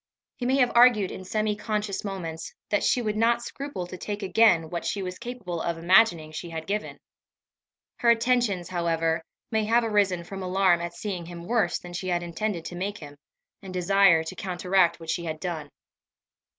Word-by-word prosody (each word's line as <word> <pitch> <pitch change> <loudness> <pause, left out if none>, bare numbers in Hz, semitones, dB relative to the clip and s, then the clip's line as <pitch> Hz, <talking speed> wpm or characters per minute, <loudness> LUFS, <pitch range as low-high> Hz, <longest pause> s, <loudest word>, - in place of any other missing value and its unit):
He 245 - -3
may 260 - +3
have 250 -3 +3
argued 235 -5 +5
in 190 - -7
semi 215 +2 -1
conscious 210 -2 -3
moments, 165 -5 -5 0.2
that 205 - +2
she 245 - +2
would 215 -1 -1
not 235 +2 +2
scruple 275 -7 -5
to 180 +1 -8
take 205 +2 -4
again 185 -5 +4
what 170 -2 -3
she 200 - -2
was 180 0 -6
capable 200 -9 -5
of 170 -1 -2
imagining 170 -2 +4
she 170 +2 -6
had 160 -1 -6
given. 210 +4 -3 1.0
Her 235 - +2
attentions, 230 -6 +2
however, 165 -2 0 0.3
may 220 -1 +1
have 235 +2 +3
arisen 200 -5 +1
from 195 +2 -7
alarm 185 -1 +2
at 170 0 -5
seeing 180 -5 -5
him 170 -1 -8
worse 220 -4 +1
than 175 0 -11
she 180 +2 -4
had 175 -1 0
intended 175 +1 -3
to 175 - -6
make 200 +3 -3
him, 145 -4 -11 0.5
and 190 - -9
desire 185 -2 +4
to 160 - -7
counteract 180 -1 +1
what 165 -1 -4
she 170 - -3
had 155 -1 -4
done. 160 -5 -4
185 Hz, 190 wpm, -26 LUFS, 170-215 Hz, 1.0 s, argued